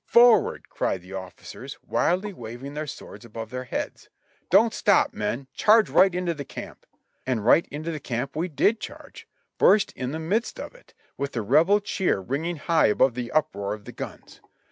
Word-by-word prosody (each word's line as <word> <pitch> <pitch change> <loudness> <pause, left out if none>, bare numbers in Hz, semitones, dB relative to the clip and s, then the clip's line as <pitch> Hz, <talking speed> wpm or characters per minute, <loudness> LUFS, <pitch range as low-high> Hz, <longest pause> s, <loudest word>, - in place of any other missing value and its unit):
Forward!" 235 -1 +5
cried 95 - -2
the 95 +1 -11
officers, 95 -1 -8
wildly 190 +4 0
waving 120 +1 -8
their 150 +1 -4
swords 130 - -9
above 115 -1 -8
their 125 0 -5
heads. - - -5 0.4
"Don't - - +5
stop, - - +3
men! 135 +4 -3
Charge 215 +1 +4
right 190 -1 +5
into 180 -1 -1
the 145 -3 -6
camp!" - - -10 0.4
And 115 -5 -1
right 155 +7 +5
into 155 +3 -5
the 155 - -5
camp 130 +1 -4
we 165 +4 -1
did 205 +7 +2
charge - - -10 0.2
— - - -51
burst 205 0 +5
in 125 -1 -5
the 155 - -4
midst 195 +9 -1
of - - -7
it, - - -21 0.2
with 140 0 -3
the 115 - -2
Rebel 165 - +4
cheer 190 - 0
ringing 145 - -3
high 165 +2 +2
above 120 +4 +3
the 120 0 -5
uproar 105 -9 0
of 105 -1 -16
the - - -8
guns. - - -9
145 Hz, 190 wpm, -25 LUFS, 120-180 Hz, 0.4 s, Forward